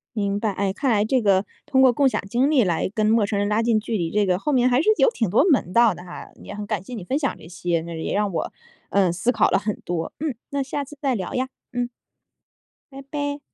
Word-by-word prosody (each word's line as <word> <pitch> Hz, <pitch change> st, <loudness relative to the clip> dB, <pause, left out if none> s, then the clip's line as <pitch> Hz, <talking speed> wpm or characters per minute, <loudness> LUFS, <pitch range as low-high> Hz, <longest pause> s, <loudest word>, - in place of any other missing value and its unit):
明 200 Hz, -2 st, 0 dB
白， 215 Hz, 0 st, 0 dB
哎， 195 Hz, 0 st, -1 dB
看 260 Hz, +5 st, 0 dB
来 210 Hz, -1 st, +3 dB
这 255 Hz, +3 st, +2 dB
个 200 Hz, -2 st, +3 dB, 0.2 s
通 265 Hz, -, +3 dB
过 260 Hz, -2 st, +6 dB
共 275 Hz, +3 st, +3 dB
享 -, -, -2 dB
经 255 Hz, +7 st, +2 dB
历 270 Hz, -6 st, +4 dB
来 175 Hz, -1 st, 0 dB
跟 215 Hz, -1 st, +1 dB
陌 220 Hz, -1 st, +3 dB
生 200 Hz, 0 st, -1 dB
人 205 Hz, -, +1 dB
拉 210 Hz, +2 st, +1 dB
近 230 Hz, -2 st, +3 dB
距 220 Hz, +1 st, -3 dB
离， 170 Hz, -3 st, -1 dB
这 210 Hz, 0 st, +2 dB
个 180 Hz, -2 st, +2 dB
后 295 Hz, -, -2 dB
面 255 Hz, -2 st, +3 dB
还 250 Hz, +2 st, +3 dB
是 380 Hz, -, +2 dB
有 -, -, +5 dB
挺 230 Hz, -, -1 dB
多 220 Hz, -, +4 dB
门 255 Hz, -, +2 dB
道 230 Hz, +1 st, +5 dB
的 175 Hz, -, -11 dB
哈， 180 Hz, -, -9 dB
也 -, -, -8 dB
很 210 Hz, 0 st, -5 dB
感 210 Hz, -4 st, -2 dB
谢 250 Hz, -, -10 dB
你 220 Hz, -6 st, -5 dB
分 260 Hz, +10 st, -1 dB
享 275 Hz, -4 st, -1 dB
这 -, -, -13 dB
些， 175 Hz, -1 st, -2 dB
那 170 Hz, -, -7 dB
也 -, -, -2 dB
让 205 Hz, 0 st, 0 dB
我， -, -, -2 dB, 0.4 s
呃， 195 Hz, -2 st, +3 dB
思 180 Hz, +8 st, 0 dB
考 -, -, +3 dB
了 -, -, +3 dB
很 205 Hz, +1 st, -3 dB
多。 170 Hz, -2 st, -3 dB
嗯， 300 Hz, -4 st, -2 dB
那 280 Hz, 0 st, -1 dB
下 275 Hz, +2 st, -3 dB
次 295 Hz, +2 st, -12 dB
再 270 Hz, -4 st, +1 dB
聊 185 Hz, -4 st, -4 dB
呀， 255 Hz, +1 st, -1 dB, 0.2 s
嗯。 245 Hz, -1 st, -2 dB, 1.0 s
拜 270 Hz, 0 st, -9 dB
拜。 285 Hz, 0 st, -3 dB
220 Hz, 285 characters per minute, -23 LUFS, 195-260 Hz, 1.0 s, 过